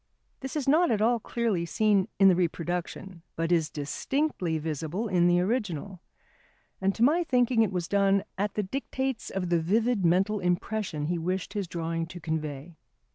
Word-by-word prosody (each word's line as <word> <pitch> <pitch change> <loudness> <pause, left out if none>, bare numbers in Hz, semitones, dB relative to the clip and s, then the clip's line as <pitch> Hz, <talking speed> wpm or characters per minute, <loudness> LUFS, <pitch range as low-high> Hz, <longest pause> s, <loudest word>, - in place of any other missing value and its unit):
This 265 +2 -6
is 290 -4 -2
not 320 +4 +4
at 215 - +1
all 230 +2 +3
clearly 225 -6 -1
seen 200 +2 +2
in 195 - +6
the 185 - +6
reproduction, 175 +1 -3
but 165 +1 -1
#is 165 -3 +2
distinctly 170 - -2
visible 160 +7 -3
in 180 -3 +3
the 175 0 +4
original#. 195 - -2 0.8
And 195 +1 +1
to 230 - +1
my 320 +7 +4
thinking 250 -5 +2
it 220 - +2
was 180 -2 -2
done 200 -1 +2
at 205 +1 -2
the 210 - 0
dictates 265 +3 -3
of 180 -2 -3
the 170 - +4
vivid 220 +5 +1
mental 190 +5 +2
impression 180 -3 -1
he 170 +2 -1
wished 185 +4 -3
his 200 -4 -2
drawing 165 -1 -3
to 175 +1 -9
convey. 155 -1 -4
190 Hz, 175 wpm, -28 LUFS, 170-220 Hz, 0.8 s, in